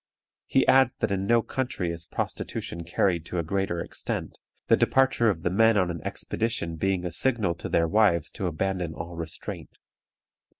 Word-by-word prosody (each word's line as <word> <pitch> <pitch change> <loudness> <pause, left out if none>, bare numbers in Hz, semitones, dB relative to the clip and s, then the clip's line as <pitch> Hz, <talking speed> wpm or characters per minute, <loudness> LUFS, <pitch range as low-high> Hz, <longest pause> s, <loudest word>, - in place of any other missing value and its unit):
He 135 - +3
adds 130 -2 +5
that - - -1
in 95 0 -1
no 115 0 +4
country 120 -10 -2
is 85 +1 -4
prostitution 85 0 -4
carried 85 0 +1
to 90 - -4
a 85 - 0
greater 95 +1 -1
extent, - - -4 0.3
the - - +6
departure 130 -3 +3
of 85 -5 -2
the - - 0
men 110 +3 +4
on 90 -3 +2
an 85 - -6
expedition 110 -8 -2
being 95 +1 0
a 90 - -2
signal 110 -1 +1
to - - -6
their 85 0 +2
wives 85 -4 +3
to 95 - -3
abandon 90 0 -2
all 85 +1 -7
restraint. 80 -1 -7
90 Hz, 175 wpm, -26 LUFS, 85-110 Hz, 0.3 s, the